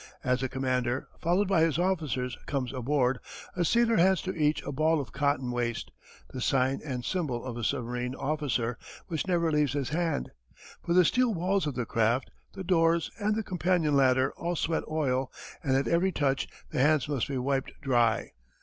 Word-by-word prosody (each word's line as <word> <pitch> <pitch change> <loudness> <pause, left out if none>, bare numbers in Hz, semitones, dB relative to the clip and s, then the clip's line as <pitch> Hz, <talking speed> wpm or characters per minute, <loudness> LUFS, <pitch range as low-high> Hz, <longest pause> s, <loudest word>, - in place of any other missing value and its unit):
As 125 0 +1
the 130 - -1
commander, 130 -1 -1
followed 180 +4 +2
by 185 -4 +3
his 165 -2 +2
officers, 155 -9 -1
comes 130 -3 -2
aboard, 130 -1 +1 0.4
a 180 - +1
sailor 230 +5 +3
hands 190 +1 +4
to 185 - -3
each 150 -2 +1
a - - -4
ball 155 +3 +2
of 130 -6 -5
cotton 140 -3 0
waste, 120 -1 -2 0.4
the 130 - -5
sign 130 +1 +1
and 125 -5 -4
symbol 140 -11 -2
of 125 -3 -5
a 120 - -5
submarine 125 0 -2
officer, 135 -6 -1 0.3
which 160 +1 -2
never 170 -3 +2
leaves 150 -3 +2
his 140 -3 -2
hand. 165 - -1 0.5
For 170 - 0
the 180 0 +6
steel 245 +3 +2
walls 185 0 0
of 145 - -3
his 125 - -2
craft, 115 +3 +1 0.2
the 190 - -6
doors, 165 -2 +2
and 210 0 +1
the 220 - -1
companion 175 -5 +1
ladder 130 -1 +3
all 175 +1 -2
sweat 165 0 0
oil, 135 -4 0 0.3
and 135 -5 +1
at 135 - 0
every 175 +3 +2
touch 140 -5 0 0.2
the - - -2
hands 145 -1 +3
must 140 -5 -1
be 140 - -3
wiped 135 +1 -1
dry. 120 -4 +1
145 Hz, 185 wpm, -29 LUFS, 125-170 Hz, 0.5 s, the